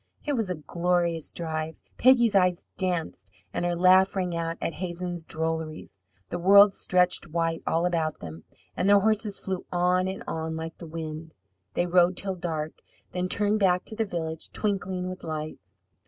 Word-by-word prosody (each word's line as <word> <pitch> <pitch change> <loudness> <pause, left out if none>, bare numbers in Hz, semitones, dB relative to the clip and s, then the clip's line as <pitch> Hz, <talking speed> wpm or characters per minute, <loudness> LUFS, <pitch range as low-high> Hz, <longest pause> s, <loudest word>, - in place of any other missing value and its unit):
It 295 - 0
was 225 -7 -1
a 180 - -1
glorious 170 +1 0
drive. 160 -1 -4 0.2
Peggy's 240 -3 +5
eyes 180 -2 +3
danced 170 - -2 0.2
and - - -2
her 175 0 0
laugh 185 +2 +5
rang 180 -3 -1
out 165 0 -2
at 165 - -2
Hazen's 175 -1 -4
drolleries. 160 -8 -4 0.3
The 175 - -2
world 200 +3 +7
stretched 180 -2 +1
white 165 0 -1
all 165 +2 +2
about 165 -3 0
them, 80 -1 -9 0.3
and 190 - +1
their 200 0 +6
horses 215 -1 +1
flew 190 -2 -4
on 180 +1 +2
and 190 +1 -5
on 160 0 -3
like 160 0 -6
the 170 - -8
wind. 160 0 -6 0.4
They 175 - +2
rode 180 +1 +3
till 195 -1 -2
dark, 160 -3 -4 0.3
then 180 0 -2
turned 210 +2 +1
back 180 -2 +3
to 220 - -6
the 225 - +1
village, 160 -5 -4
twinkling 190 -3 -2
with 185 0 -7
lights. 155 -1 -7
175 Hz, 170 wpm, -27 LUFS, 160-190 Hz, 0.4 s, world